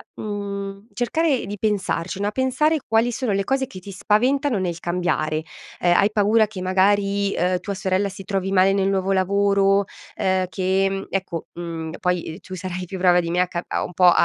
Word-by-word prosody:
mhmm, 200 0 -5
cercare 280 +2 0
di 205 +1 -6
pensarci, 190 -4 -1
no, 205 +1 0
pensare 260 +6 +1
quali 225 +2 +2
sono 245 -1 -2
le 195 0 +1
cose 265 +5 0
che 185 - -10
ti 200 +2 -10
spaventano 245 +6 +1
nel 175 -3 -2
cambiare. 175 -3 -1 0.4
Ehm, 175 0 +3
hai 200 +3 +4
paura 215 +1 +4
che 200 -3 -7
magari, 200 +2 +2
uhm, 180 +1 +1
tua 200 +3 -4
sorella 190 0 0
si 195 0 -9
trovi 195 -1 -2
male 190 0 +4
nel 195 -1 +1
nuovo 195 0 0
lavoro, 200 +1 +3 0.3
ehm, 185 -1 +1
che, 190 +2 +1
mhmm, 195 0 -4
ecco, 185 -4 -3
mhmm, 165 -2 -5
poi 180 -1 -2
tu 185 0 -8
sarai 185 0 -5
più 190 +2 -6
brava 180 -1 +4
di 170 -1 -2
me 175 - +1
a 180 - +1
ca 175 0 -4 0.2
un - - -9
po' 180 +2 +3
a 175 - +9
195 Hz, 195 wpm, -22 LUFS, 180-205 Hz, 0.4 s, a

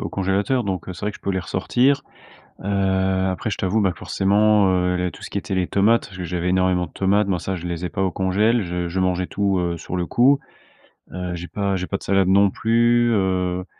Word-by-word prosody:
au - - -3
congélateur, 100 +6 0
donc, 95 -4 -3
heu, - - -4
c'est - - -11
vrai - - 0
que - - -11
je - - -27
peux 100 - -1
les 95 - -1
ressortir, 125 +10 +1 0.6
heu, 95 -1 +1
après 95 +4 -3
je 100 - -2
t'avoue, 95 +4 0
bah, 95 -3 +2
forcément, 105 +1 +2
heu, 90 0 +1
les 90 0 -1
tout - - -14
ce - - -8
qui 100 - -2
était 95 0 -4
les 90 -1 +1
tomates, 105 +2 +2
je 90 0 -7
j'avais 90 +1 -2
énormément 90 -1 +1
de - - -17
tomates, 100 +2 +1
moi, 90 -4 -1
ça, 95 -1 -3
je 90 +1 -7
les 85 0 -4
ai - - -1
pas 95 -3 -3
au 90 - -1
congélateur, 105 +5 +1
je 90 0 -3
je 95 +2 -2
mangeais 90 -1 0
tout, 100 -2 0
heu, 85 -1 -1
sur 90 - -5
le 90 -1 -1
coup, 135 +3 +4 0.7
heu, 90 0 -4
j'ai 85 +1 -7
pas 100 -1 -1
j'ai 90 -1 -3
pas 100 - -2
de - - -15
salade 95 -1 +2
non 100 +1 +5
plus, 120 +2 +2
heu, 90 -3 0
95 Hz, 245 wpm, -22 LUFS, 90-100 Hz, 0.7 s, non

